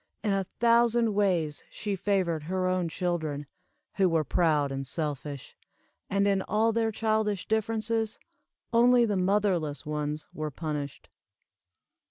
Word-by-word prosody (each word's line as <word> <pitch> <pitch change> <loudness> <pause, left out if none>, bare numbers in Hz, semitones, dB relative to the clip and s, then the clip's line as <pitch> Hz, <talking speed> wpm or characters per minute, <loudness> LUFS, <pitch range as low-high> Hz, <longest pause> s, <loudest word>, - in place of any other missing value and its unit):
In 210 -3 +1
a 195 -2 -1
thousand 235 -1 +4
ways 180 -7 +1
she 205 -2 -3
favored 180 -5 0
her 185 +2 -1
own 185 -2 0
children, 160 -4 -2 0.5
who 190 -2 +4
were 165 -2 +2
proud 150 -2 +2
and 135 0 -4
selfish; 145 -1 -4 0.5
and 200 +1 +2
in 195 -1 +2
all 220 +3 +1
their 225 0 +1
childish 215 -3 0
differences, 220 0 0 0.6
only 240 +1 +5
the 210 -3 0
motherless 185 -6 +1
ones 150 0 -3
were 155 0 -3
punished. 150 -2 -5
185 Hz, 130 wpm, -28 LUFS, 155-215 Hz, 0.6 s, only